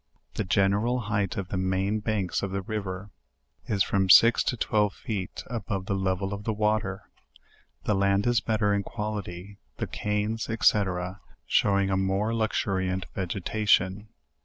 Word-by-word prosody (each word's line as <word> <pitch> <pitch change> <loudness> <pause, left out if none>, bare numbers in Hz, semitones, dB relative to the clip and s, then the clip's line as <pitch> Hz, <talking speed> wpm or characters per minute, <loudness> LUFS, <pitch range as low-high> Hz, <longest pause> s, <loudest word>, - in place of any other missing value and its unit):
The - - -1
general 100 +6 +2
height 105 -3 -1
of 100 -1 -4
the 95 - -2
main 95 +3 0
banks 105 -4 -1
of 100 - -2
the 95 0 -3
river 100 -1 -5 0.6
is 100 -3 +2
from 95 -1 0
six 115 +5 +8
to 125 - 0
twelve. 105 -2 +1
feet 100 -5 -5
above 105 -5 -4
the 100 - -1
level 95 0 -1
of 100 0 -6
the 110 - -1
water; 105 -3 -1 0.7
the 105 - +1
land 100 0 +2
is 120 -2 +3
better 110 -2 +1
in 100 - +1
quality, 100 -2 -6 0.2
the - - -2
canes, 105 +2 -2
&c. 110 - -3 0.9
showing 100 -1 +2
a 95 - +2
more 95 +4 0
luxuriant 95 -4 -1
vegetation. 95 +1 0
100 Hz, 150 wpm, -27 LUFS, 95-110 Hz, 0.9 s, six